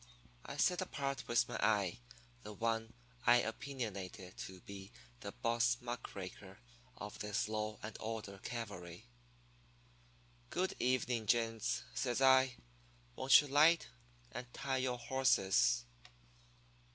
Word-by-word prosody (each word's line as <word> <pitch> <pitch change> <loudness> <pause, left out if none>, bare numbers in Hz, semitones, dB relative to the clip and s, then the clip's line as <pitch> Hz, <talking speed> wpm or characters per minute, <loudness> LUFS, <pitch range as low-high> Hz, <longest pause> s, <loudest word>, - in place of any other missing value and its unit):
I - - -7
set 180 +1 +3
apart 140 -6 -3
with 120 - +3
my - - -4
eye 105 -2 +2 0.4
the 105 -2 -8
one 115 +1 -1 0.3
I 120 - +9
opinionated 105 -7 -5
to 95 -1 -11
be 95 -1 -9 0.3
the - - -6
boss 115 +1 +1
muck 120 0 -6
raker 95 0 -8 0.4
of 105 0 -7
this 105 0 -1
law 110 0 -2
and 105 - -6
order 110 -3 -5
cavalry. 100 -5 -6 1.4
"'Good 185 +2 0
evening, 125 -3 +1
gents,' 115 0 +1
says 125 -1 0
I. 130 -1 +6 0.6
'Won't 130 +3 +7
you 145 - -7
'light, 155 +3 +5 0.4
and 125 +1 -7
tie 135 -1 -1
your 130 -1 0
horses?' 120 - +3
115 Hz, 120 wpm, -36 LUFS, 105-130 Hz, 1.4 s, I